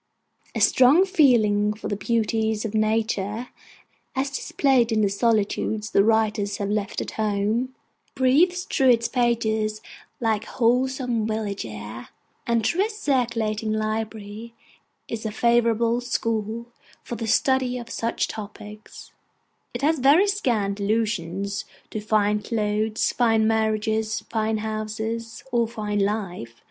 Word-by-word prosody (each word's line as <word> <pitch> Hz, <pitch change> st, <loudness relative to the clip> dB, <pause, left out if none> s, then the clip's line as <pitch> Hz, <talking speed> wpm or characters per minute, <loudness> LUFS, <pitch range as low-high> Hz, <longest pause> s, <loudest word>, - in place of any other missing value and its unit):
A -, -, -1 dB
strong 275 Hz, +9 st, +6 dB
feeling 220 Hz, -, +3 dB
for 210 Hz, -, -7 dB
the 205 Hz, -, -1 dB
beauties 220 Hz, 0 st, 0 dB
of 220 Hz, -, -4 dB
nature, 215 Hz, +1 st, 0 dB, 0.7 s
as 270 Hz, +1 st, -1 dB
displayed 265 Hz, -4 st, +1 dB
in 220 Hz, -1 st, +2 dB
the 205 Hz, -, +3 dB
solitudes 215 Hz, 0 st, 0 dB
the 200 Hz, -, +4 dB
writers 215 Hz, -2 st, +1 dB
have 200 Hz, 0 st, -2 dB
left 205 Hz, -1 st, -2 dB
at -, -, -5 dB
home, 215 Hz, +5 st, 0 dB, 0.4 s
breathes 320 Hz, +8 st, +3 dB
through 270 Hz, -8 st, +2 dB
its 235 Hz, -1 st, +4 dB
pages 220 Hz, -3 st, 0 dB, 0.4 s
like 220 Hz, -2 st, 0 dB
wholesome 250 Hz, -1 st, 0 dB
village 210 Hz, -, -3 dB
air; 105 Hz, +2 st, -8 dB, 0.4 s
and 230 Hz, -2 st, +1 dB
though 360 Hz, -, +2 dB
a 430 Hz, -, -1 dB
circulating 230 Hz, -, -1 dB
library 215 Hz, +1 st, -4 dB, 0.5 s
is 225 Hz, -1 st, -5 dB
a 220 Hz, -, -2 dB
favourable 235 Hz, +1 st, +2 dB
school 230 Hz, -1 st, -2 dB, 0.4 s
for 240 Hz, -, -5 dB
the 225 Hz, 0 st, -4 dB
study 255 Hz, +2 st, +2 dB
of 235 Hz, -2 st, -8 dB
such 230 Hz, 0 st, -1 dB
topics, 210 Hz, 0 st, -10 dB, 0.6 s
it 240 Hz, +2 st, -6 dB
has 310 Hz, +1 st, +2 dB
very 285 Hz, +9 st, +5 dB
scant 230 Hz, -, 0 dB
allusion 200 Hz, -3 st, -1 dB, 0.5 s
to 215 Hz, -, -4 dB
fine 210 Hz, -1 st, +1 dB
clothes, 215 Hz, 0 st, 0 dB
fine 225 Hz, -3 st, +2 dB
marriages, 220 Hz, 0 st, 0 dB
fine 220 Hz, -1 st, 0 dB
houses, 220 Hz, +1 st, -4 dB
or 235 Hz, -1 st, +2 dB
fine 210 Hz, -3 st, -3 dB
life. 195 Hz, -, -2 dB
220 Hz, 130 wpm, -24 LUFS, 210-240 Hz, 0.7 s, strong